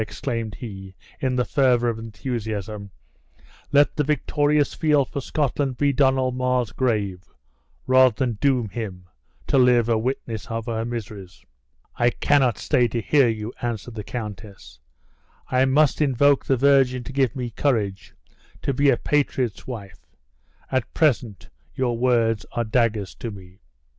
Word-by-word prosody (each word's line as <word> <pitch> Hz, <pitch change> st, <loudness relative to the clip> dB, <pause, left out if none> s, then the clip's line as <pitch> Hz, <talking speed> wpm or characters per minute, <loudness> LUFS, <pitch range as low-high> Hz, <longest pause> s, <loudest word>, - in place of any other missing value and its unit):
exclaimed 115 Hz, 0 st, -4 dB
he, 95 Hz, -5 st, -9 dB, 0.2 s
in 130 Hz, -1 st, 0 dB
the 125 Hz, -1 st, +1 dB
fervor 125 Hz, -3 st, +2 dB
of 115 Hz, -1 st, -1 dB
enthusiasm, 110 Hz, -2 st, -5 dB, 0.8 s
"let 145 Hz, 0 st, +4 dB
the 150 Hz, -, +1 dB
victorious 150 Hz, 0 st, +1 dB
field 150 Hz, -4 st, +2 dB
for 140 Hz, -, -5 dB
Scotland 140 Hz, -2 st, -1 dB
be 145 Hz, -1 st, +2 dB
Donald 130 Hz, -2 st, +2 dB
Mar's 125 Hz, -3 st, 0 dB
grave, 100 Hz, -8 st, -1 dB, 0.6 s
rather 130 Hz, -2 st, +5 dB
than 125 Hz, -1 st, -1 dB
doom 130 Hz, -5 st, +2 dB
him 95 Hz, -4 st, -6 dB, 0.4 s
to 135 Hz, -, +2 dB
live 125 Hz, -2 st, +4 dB
a 115 Hz, -2 st, +2 dB
witness 115 Hz, -3 st, -4 dB
of 115 Hz, -1 st, -4 dB
her 115 Hz, -2 st, -2 dB
miseries!" 105 Hz, -7 st, -7 dB, 0.5 s
"I 120 Hz, -, +4 dB
cannot 130 Hz, -1 st, +2 dB
stay 125 Hz, -5 st, +2 dB
to 115 Hz, +1 st, -3 dB
hear 135 Hz, +2 st, +3 dB
you!" 110 Hz, +1 st, -4 dB
answered 120 Hz, -1 st, -4 dB
the 105 Hz, -2 st, -6 dB
countess; 105 Hz, -, -8 dB, 0.7 s
"I 130 Hz, +1 st, +3 dB
must 145 Hz, +3 st, +3 dB
invoke 140 Hz, 0 st, +3 dB
the 135 Hz, -, +2 dB
Virgin 130 Hz, -2 st, +3 dB
to 135 Hz, -, -8 dB
give 130 Hz, -4 st, +1 dB
me 125 Hz, -3 st, -4 dB
courage 105 Hz, -7 st, -1 dB, 0.5 s
to 140 Hz, -, 0 dB
be 140 Hz, +2 st, +3 dB
a 125 Hz, -, +3 dB
patriot's 130 Hz, -7 st, -1 dB
wife; 105 Hz, -8 st, -9 dB, 0.6 s
at 130 Hz, -3 st, -1 dB
present, 120 Hz, -, +1 dB, 0.3 s
your 125 Hz, -2 st, 0 dB
words 115 Hz, -3 st, +1 dB
are 120 Hz, -, 0 dB
daggers 110 Hz, -3 st, 0 dB
to 115 Hz, -, -6 dB
me." 95 Hz, -3 st, -12 dB
120 Hz, 150 wpm, -23 LUFS, 110-135 Hz, 0.8 s, rather